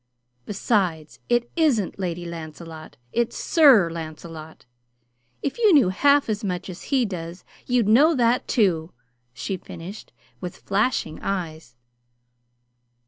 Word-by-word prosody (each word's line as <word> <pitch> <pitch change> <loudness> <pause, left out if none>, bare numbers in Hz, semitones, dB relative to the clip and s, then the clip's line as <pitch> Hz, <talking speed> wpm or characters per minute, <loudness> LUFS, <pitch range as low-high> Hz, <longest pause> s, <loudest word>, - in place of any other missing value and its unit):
Besides, 190 -7 -1
it 240 0 +1
isn't 265 - +1
'Lady 175 -2 -3
Lancelot,' 160 -2 -9 0.2
it's 235 0 0
'Sir 270 - +5
Lancelot.' 160 -1 -8 0.8
If 280 - -3
you 435 -3 +5
knew 260 -10 +5
half 280 +9 +3
as 215 -2 -2
much 185 -1 -3
as 175 - -11
he 265 -4 +3
does 175 -3 -7 0.2
you'd 245 -4 +2
know 290 +10 +5
that, 245 -1 +2
too!" 175 -7 +1 0.4
she 125 +11 -4
finished, 185 +4 -10 0.3
with 180 -2 -7
flashing 200 -5 -1
eyes. 160 -9 -4
190 Hz, 120 wpm, -24 LUFS, 165-240 Hz, 0.8 s, Sir